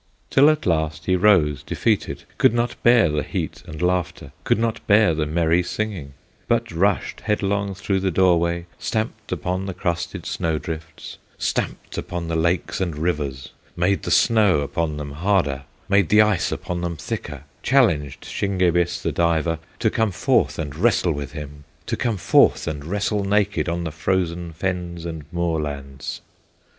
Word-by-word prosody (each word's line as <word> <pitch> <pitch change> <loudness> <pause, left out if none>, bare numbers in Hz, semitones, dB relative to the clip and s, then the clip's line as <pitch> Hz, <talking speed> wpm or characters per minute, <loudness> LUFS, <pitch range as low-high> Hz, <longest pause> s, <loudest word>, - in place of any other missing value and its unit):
Till 140 +3 +6
at 155 -1 0
last 80 -3 0
he 95 - +2
rose 90 -7 +4
defeated, - - -1 0.2
Could 115 - +4
not 120 0 0
bear 120 -4 +6
the 75 -1 0
heat - - -4
and 75 - -8
laughter, 90 -6 -1
Could - - +3
not 115 0 -1
bear 105 -4 +5
the 75 -1 -1
merry 85 +2 +2
singing, 90 -7 -4 0.3
But - - +1
rushed 95 +3 0
headlong 100 -2 -1
through 95 0 -1
the 95 0 0
door 90 -1 +4
way, 85 0 -1
Stamped 110 0 -3
upon 95 +2 -2
the 95 - -4
crusted 85 -1 -3
snow 80 -2 -1
drifts, 80 0 -7 0.2
Stamped - - -3
upon 85 -2 -5
the 85 - -1
lakes 85 +3 0
and 85 -5 -2
rivers, 75 -6 -2 0.2
Made 90 +3 +1
the - - -4
snow 105 -9 +4
upon 75 +1 -2
them 75 -1 -5
harder, 75 -4 0 0.2
Made 100 -4 +3
the 105 0 +7
ice 105 -5 +1
upon 90 -1 -3
them 85 -2 -3
thicker, 80 - -5 0.2
Challenged 85 - +2
Shingebis, 90 -3 0
the - - 0
diver, 80 -1 +1 0.2
To 110 -3 +1
come 110 -1 +1
forth - - +1
and 75 -3 -4
wrestle 95 -1 +2
with 70 -2 -5
him, 75 -1 -8 0.2
To - - -1
come 115 -4 -1
forth 85 - +4
and 75 -2 -4
wrestle 105 +3 -1
naked 100 -5 +1
On 85 +1 -2
the 80 - -3
frozen 85 +1 -1
fens 85 0 -3
and 80 -3 -6
moorlands. 75 -6 -3
85 Hz, 165 wpm, -22 LUFS, 80-100 Hz, 0.3 s, the